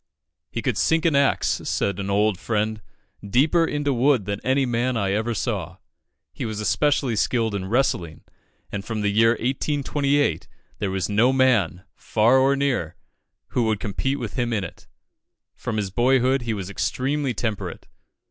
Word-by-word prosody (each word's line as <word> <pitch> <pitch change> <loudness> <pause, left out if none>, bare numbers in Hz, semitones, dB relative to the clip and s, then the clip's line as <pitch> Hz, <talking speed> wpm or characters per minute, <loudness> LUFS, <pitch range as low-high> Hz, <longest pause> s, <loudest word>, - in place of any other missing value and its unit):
"He - - -5
could - - 0
sink 160 0 +2
an 160 -4 +3
axe," 140 0 +2
said 100 -2 -1
an 100 0 -3
old 105 -1 +2
friend, 110 -1 -1 0.4
"deeper 145 - +3
into 145 -2 -1
wood 125 -3 +2
than 100 0 -3
any 135 +1 +2
man 120 0 0
I 100 -3 0
ever 110 +3 -1
saw." - - -3 0.6
He - - -6
was 110 -2 -4
especially 135 +2 +1
skilled 115 0 0
in 95 -2 -3
wrestling, 95 - 0 0.5
and 100 -1 -4
from 110 0 -4
the 105 -1 +1
year 115 +2 +4
1828 140 - 0 0.3
there 100 - -1
was 95 -1 -1
no 110 +5 +3
man, 115 -9 +2
far 115 +4 +2
or 135 +1 +3
near, 130 - -1 0.5
who 120 - 0
would 110 -2 0
compete 125 +6 -2
with 120 -6 -5
him 120 -2 -1
in 105 -3 0
it. 85 - -10 0.7
From 110 - -4
his 100 -3 -2
boyhood, 130 +3 +2
he 115 -1 -2
was 95 -3 -5
extremely 135 +4 -1
temperate. 110 -2 -4
115 Hz, 165 wpm, -23 LUFS, 105-135 Hz, 0.7 s, year